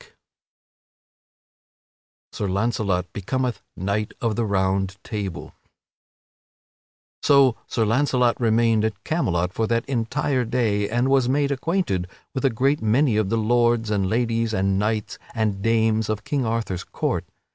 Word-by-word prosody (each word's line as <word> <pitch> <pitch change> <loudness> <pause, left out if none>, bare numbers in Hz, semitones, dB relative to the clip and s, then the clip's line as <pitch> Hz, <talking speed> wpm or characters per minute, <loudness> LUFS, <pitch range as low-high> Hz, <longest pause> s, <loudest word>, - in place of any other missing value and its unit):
[Sidenote: - - -33
Sir 105 - -2
Launcelot 100 -2 -1
becometh 125 +4 -2 0.2
knight 100 +3 -2
of 115 -3 -1
the 115 - 0
Round 95 -1 0
Table] 100 -5 -5 1.7
So 135 -4 +5
Sir 115 - 0
Launcelot 125 +1 +2
remained 115 -1 +3
at 110 -2 -2
Camelot 90 - 0
for 110 +2 0
that 115 0 0
entire 130 +1 0
day 110 -4 0
and 120 +3 +1
was 135 -2 +3
made 140 +1 +1
acquainted 135 - -1 0.3
with 130 - -3
a 135 - +4
great 135 +5 +1
many 115 +3 +2
of 105 -2 +1
the 115 - +1
lords 120 0 +2
and 100 -3 +1
ladies 115 0 0
and 95 0 +1
knights 105 0 -2 0.2
and 105 -3 -1
dames 110 -1 +2
of 110 -1 -2
King 140 -4 -1
Arthur's 110 -6 -2
court. - - -2
115 Hz, 135 wpm, -23 LUFS, 105-125 Hz, 1.7 s, So